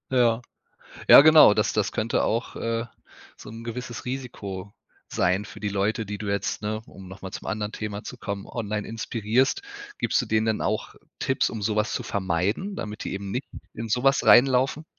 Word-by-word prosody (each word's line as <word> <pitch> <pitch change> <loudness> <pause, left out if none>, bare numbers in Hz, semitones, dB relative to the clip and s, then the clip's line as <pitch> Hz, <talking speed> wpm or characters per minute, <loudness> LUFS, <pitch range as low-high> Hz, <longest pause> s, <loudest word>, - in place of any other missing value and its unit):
Ja. 120 -2 +3 0.7
Ja, - - +12
genau, 155 -7 +8
das 105 - +1
das 105 -2 0
könnte 110 +1 0
auch, 115 +2 -1
äh, 115 0 -2 0.5
so - - -11
'n 115 +1 -9
gewisses 120 -2 -6
Risiko 100 -7 -6 0.4
sein 95 +4 0
für - - -11
die 105 - -2
Leute, 105 +3 -1
die 105 0 -6
du 105 - -5
jetzt, 100 0 -2
ne, 110 +1 -3
um 95 -1 -13
noch 95 +1 -12
mal 95 - -6
zum - - -8
anderen 105 0 -2
Thema 105 -1 -5
zu 125 - -8
kommen, 100 -2 -5
online 105 -3 -4
inspirierst. 115 - 0 0.3
Gibst - - +1
du 125 - -7
denen 110 0 +1
denn 110 -1 0
auch 110 - -2 0.3
Tipps, 130 - +1
um 110 - -6
so 105 +1 0
was 105 0 +1
zu - - -2
vermeiden, 100 - -1
damit 105 - -6
die - - -4
eben 100 0 -5
nicht 125 +6 -3 0.3
in 115 0 -6
so 125 +4 0
was 135 -1 +3
reinlaufen? 130 +6 +5
110 Hz, 195 wpm, -25 LUFS, 100-120 Hz, 0.7 s, Ja